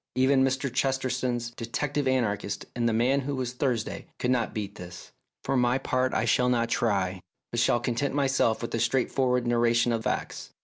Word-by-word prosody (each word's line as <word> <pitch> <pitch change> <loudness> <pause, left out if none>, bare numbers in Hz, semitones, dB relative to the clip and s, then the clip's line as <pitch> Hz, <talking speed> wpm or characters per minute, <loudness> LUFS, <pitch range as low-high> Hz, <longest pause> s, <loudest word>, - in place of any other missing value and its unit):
Even 130 +1 +4
Mr. 135 -1 0
Chesterton's 130 -3 -1
detective 135 +4 -2
anarchists 105 -6 -1
in 120 -1 +1
the - - +2
"Man 125 +5 +2
who 140 +1 -3
was 125 -2 -3
Thursday 125 -4 -2
" - - -51
could 125 - 0
not 120 -3 +1
beat 100 -2 -4
this. 90 -3 -10 0.3
For 135 - -1
my 125 0 +3
part 130 -1 0
I - - 0
shall 125 0 +3
not 115 -2 +1
try, 95 -6 0 0.3
but 120 - -1
shall 120 - +3
content 125 +4 -1
myself 135 -5 +1
with 115 - -4
a 115 - 0
straightforward 125 +1 +1
narration 120 0 +2
of 115 -1 -2
facts. - - -3
125 Hz, 185 wpm, -27 LUFS, 115-130 Hz, 0.3 s, Even